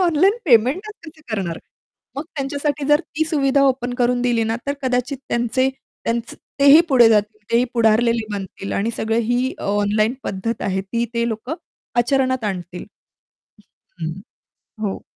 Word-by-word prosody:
Online 365 +4 +3
पेमेंटच 280 - +3
कसं 315 0 -13
करणार? 175 -5 -3 0.6
मग 280 - -3
त्यांच्यासाठी 285 +1 -2
जर 295 +1 +5 0.2
ती 315 - +2
सुविधा 280 -3 +2
ओपन 250 -2 0
करून 245 0 +1
दिली 240 -2 +2
ना, 225 +1 -1
तर 280 - +1
कदाचित 255 +1 -1
त्यांचे 240 +2 +1 0.4
त्यांचं 235 0 -2 0.2
तेही 285 +3 +8
पुढे 245 -5 +6
जातील. 215 -1 +2
तेही 235 +1 +4
पुढारलेले 230 0 +3
बनतील 195 0 -5
आणि 215 +4 0
सगळं 225 +1 0
ही 250 +2 +1
ऑनलाईन 205 +3 +1
पद्धत 215 +4 -3
आहे, 190 -1 0
ती 230 +5 -2
ते 235 0 +1
लोक 225 +3 -5 0.5
आचरणात 260 0 +1
आणतील. 180 -3 -4 1.2
अं, 160 - -1
हं, 180 +4 -8 0.7
हो. 195 - -5
240 Hz, 145 wpm, -21 LUFS, 215-275 Hz, 1.2 s, तेही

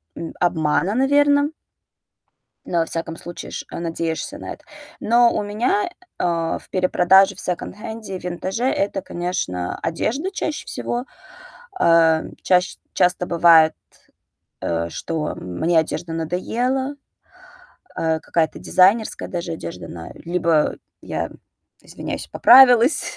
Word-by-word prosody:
м, 165 - -6
обмана, 175 +3 +1
наверное. 285 +2 +3 1.1
Но, 170 - 0
во 165 - +2
всяком 165 0 -5
случае, 175 +1 -9
ш - - -6
надеешься 170 - -3
на - - -7
это. - - -16 0.4
Но 235 +1 +4
у 210 - -1
меня, 210 +1 0 0.3
э, - - -1 0.4
в - - -19
перепродаже, 190 +1 +4
в - - -12
секонд-хенде 210 +3 -5
и - - -11
винтаже 185 +7 -3
это, 195 -6 0
конечно, 175 - -3
одежда 245 - -2
чаще 310 -5 -4
всего. 240 +1 -3 0.8
Э, 165 -1 +5 0.2
чащ 180 0 +2 0.2
часто 180 0 +2
бывает, 165 -2 +5 0.9
э, 85 0 -2
что 155 - -3
мне 160 - 0
одежда 165 +1 -2
надоела, 245 - -2 1.0
э, 160 -1 0
какая-то 160 -1 -1
дизайнерская 200 +4 +2
даже 170 -1 -4
одежда 90 - -7
на 85 -1 -9
либо 170 -2 0 0.3
я, - - -3 0.5
извиняюсь, - - -6
поправилась. 250 +1 +6
180 Hz, 115 wpm, -21 LUFS, 165-230 Hz, 1.1 s, поправилась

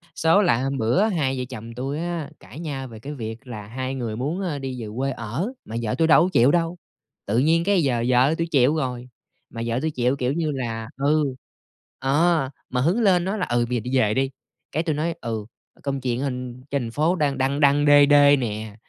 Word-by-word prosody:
Số 165 +6 +4
là 125 - +2
hôm 135 0 -1
bữa 120 - +2
á, 220 - +3
hai 135 -3 0
vợ - - -1
chồng 115 -2 -8
tui 135 +5 -3
á 170 -4 -3
cãi 145 - -12
nhau 140 -5 -5
về 115 -3 -11
cái 140 +7 -7
việc 115 0 -7
là 105 -4 -7
hai 130 +4 -4
người 115 -4 -3
muốn, 145 - -2
a, 165 -7 -2
đi 130 -2 -5
về 110 - -5
quê 135 +1 0
ở, 130 - -4
mà 110 - -7
vợ 110 -2 -1
tui 165 - +2
đâu 160 0 +6
có 180 - +1
chịu 125 +4 +5
đâu, 170 +1 0 0.5
tự 105 +4 0
nhiên 160 +5 +3
cái 195 -2 +2
giờ 120 -4 +1
vợ 130 +4 +4
tui 165 - -1
chịu 140 -1 +3
rồi, 125 -5 -3 0.4
mà 115 - -7
vợ 115 +1 -1
tui 160 +1 -1
chịu, 125 -1 +1
kiểu 130 -1 -1
như 160 -1 -1
là 115 -5 -4 0.2
ừ, 150 +2 +3 0.8
ờ, 150 +1 +2 0.2
mà 125 - 0
hứng 175 - +2
lên 185 -5 +4
nói 195 +3 -1
là 185 - -1
"Ừ, 120 0 +1
bây 125 - -1
giờ - - -2
đi 135 - +1
về 110 -4 +3
đi", 135 +3 +1 0.4
cái 160 - -1
tui 160 -3 -1
nói 165 +3 -1
"Ừ, 110 -3 -4 0.4
công 140 -1 -2
chuyện 125 -1 -1
anh 125 -2 -4
trên 140 -1 0
thành 115 - -5
phố 155 +8 +1
đang 145 -5 0
đăng 135 +2 0
đăng 145 0 +4
đê 145 0 +7
đê 145 0 +6
nè". 110 -5 -4
135 Hz, 240 wpm, -23 LUFS, 120-155 Hz, 0.8 s, đê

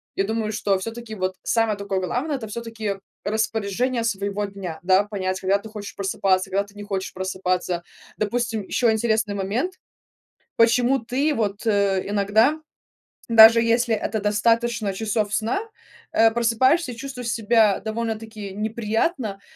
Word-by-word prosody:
я 195 - +1
думаю, 220 0 -2
что 205 -2 +1
всё 225 - -4
таки 230 -1 -8
вот 185 -1 -2
самое 225 -3 +1
такое 200 -1 -2
главное- 250 - -2
это 225 -4 -5
всё 235 +2 -5
таки 220 -3 -4 0.3
распоряжение 220 +3 -1
своего 200 -2 -2
дня. 195 -5 -7
Да, 185 +2 +4
понять, 190 -2 -3
когда 190 +1 +2
ты 220 - -11
хочешь 210 -2 -8
просыпаться, 190 -1 0
когда 200 +1 +1
ты 200 0 -19
не 205 - -8
хочешь 195 -2 -4
просыпаться. 185 -2 -2 0.3
Допустим, 225 0 -1
еще 230 +4 +1
интересный 220 -1 +1
момент, 215 - -2 0.8
почему 240 +3 +4
ты 265 +7 0
вот 210 -3 -2
иногда, 205 +5 +2 0.7
даже 230 0 +9
если 230 0 +2
это 215 +1 -2
достаточно 220 +1 +1
часов 210 0 -1
сна, 225 - 0 0.5
э, 225 0 +5
просыпаешься 245 +6 +2
и - - -10
чувствуешь 250 -1 -6
себя 220 -2 +3
довольно 225 0 -2
таки 215 -3 -8
неприятно. 220 - -1
220 Hz, 145 wpm, -23 LUFS, 200-230 Hz, 0.8 s, даже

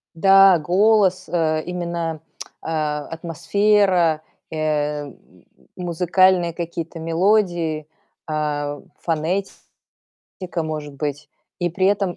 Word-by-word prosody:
Да, 195 +1 +6
голос, 190 +3 +2
э, 155 -2 0
именно, 170 -3 -3 0.4
а, 150 -2 -2
атмосфера, 175 0 +1 0.3
э, 150 -1 -1
м 140 - -9
м - - -22 0.4
музыкальные 175 0 +3
какие-то 165 -1 -5
мелодии, 165 -2 +1 0.4
а, 145 -2 -2 0.2
фонетика, 170 +4 -3 0.8
может 150 -2 -5
быть. 145 +1 -4 0.3
И 175 -1 0
при 185 +2 +1
этом 195 -3 +1
165 Hz, 95 wpm, -21 LUFS, 155-185 Hz, 0.8 s, Да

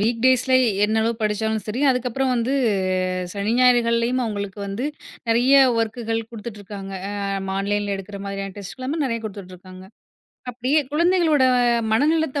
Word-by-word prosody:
Week 230 +2 0
டேஸ்ல 260 0 +4 0.3
என்னளவு 220 +2 +1
படிச்சாலும் 215 0 -1
சரி 220 +4 -3
அதுக்கப்பறம் 255 +1 0
வந்து 245 +3 0 0.8
சனி, 205 +2 -2
ஞாயிறுகள்லயும் 240 0 +3
அவுங்களுக்கு 205 -2 -4
வந்து, 200 +7 -3 0.4
நிறைய 240 +4 +3 0.2
வொர்க்கள் 225 0 -2
குடுத்துட்டு 220 -2 -8
இருக்காங்க. 195 -1 -8 0.2
ஆ - - -5 0.5
ஆன்லைன் 205 +1 -1
எடுக்குற 195 +1 -8
மாதிரியான 195 -1 -5
டெஸ்ட் 200 -2 -8
எல்லாமே 265 +5 -3
நிறைய 230 -3 -1
குடுத்துட்டு 195 -3 -8
இருக்காங்க. 185 +1 -13 0.7
அப்டியே 255 +5 +1
குழந்தைகளோட 335 -2 +3 0.5
மனநிலத்தை, 295 +3 +2
230 Hz, 130 wpm, -22 LUFS, 205-255 Hz, 0.8 s, டேஸ்ல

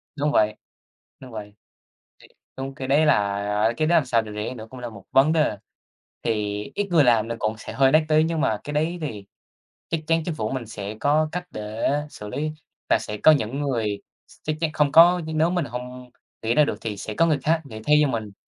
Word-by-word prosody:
Đúng 145 0 0
vậy. 105 -5 +2 0.6
Đúng 130 -1 -12
vậy. 105 -2 -8 0.7
Thiệt - - -18 0.3
đúng, 135 0 -5
cái 130 -1 -5
đấy 145 +3 +4
là 150 - +5 0.5
a, 115 - 0
cái 155 - +1
đó 175 - +3
làm 155 - +4
sao 120 -3 +2
để 110 -1 -9
rẻ 105 +4 -4
nữa 110 -3 -9
cũng 130 - -10
là 120 -1 -5
một 100 -4 -12
vấn 135 +4 +5
đề. 155 -9 +1 0.7
Thì 105 -2 -1
ít 205 -1 -1
người 165 -4 +5
làm 115 -3 +3
nó 115 - -3
cũng 110 +1 -1
sẽ - - -8
hơi 135 -1 +4
đắt 155 +2 +5
tý, 155 0 +4
nhưng 160 -1 -1
mà 110 -5 +1
cái 145 - -6
đấy 160 +4 0
thì 110 -10 -5 0.6
chắc 165 - 0
chắn 165 0 +2
chính 170 - -3
phủ 110 -6 -2
mình 130 -3 -4
sẽ 105 -1 -6
có 155 +2 +2
cách 180 +2 -3
để 105 +1 -3 0.2
xử 105 - -9
lý 155 +8 -2 0.4
và - - +5
sẽ 105 - -5
có 155 - +7
những 140 -1 0
người 115 -8 -1 0.3
s - - -19
chắc 155 - -1
chắn 160 -2 0
không 150 -2 +2
có 175 +3 +7
nếu 160 +1 +1
mình 175 -3 0
hông 125 0 -8 0.3
nghĩ 115 +1 0
ra 150 - +6
được - - -2
thì 105 -3 -4
sẽ 110 - -5
có 165 - +3
người 155 -3 +2
khác 160 +1 +2
nghĩ 110 -5 -9
thay 150 - +6
cho 150 - +4
mình. 110 -6 -3
135 Hz, 235 wpm, -24 LUFS, 110-155 Hz, 0.7 s, có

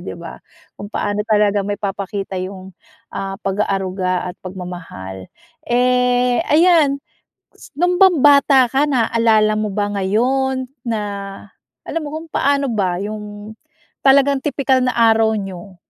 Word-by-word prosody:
'di - - -7
ba? - - -10 0.4
Kung 205 - -7
paano 205 0 -2
talaga 210 -1 +3
maipapakita 200 -1 -4
yung, 190 0 -8 0.4
ah, 195 0 -4
pag-aaruga 190 -2 -1
at - - -22
pagmamahal. 175 - -8 0.4
Eh, 250 +1 +2
ayan, 315 -3 +4 0.6
s - - -17
nong 355 +4 +1
bang 375 -4 +5
bata 280 -3 +5
ka, 275 +4 +2
naalala 225 -5 +2
mo 215 0 -1
ba 205 0 -1
ngayon 260 +6 0 0.2
na 225 -2 -1 0.8
alam 330 - -3
mo - - -4
kung, 320 +1 -7
paano 280 -1 +1
ba 190 -5 0
yung 210 0 -7 0.5
talagang 275 +1 +5
tipikal 270 -2 +1
na 255 0 0
araw 225 -1 +3
niyo. 195 -1 -7
215 Hz, 130 wpm, -18 LUFS, 195-265 Hz, 0.8 s, bang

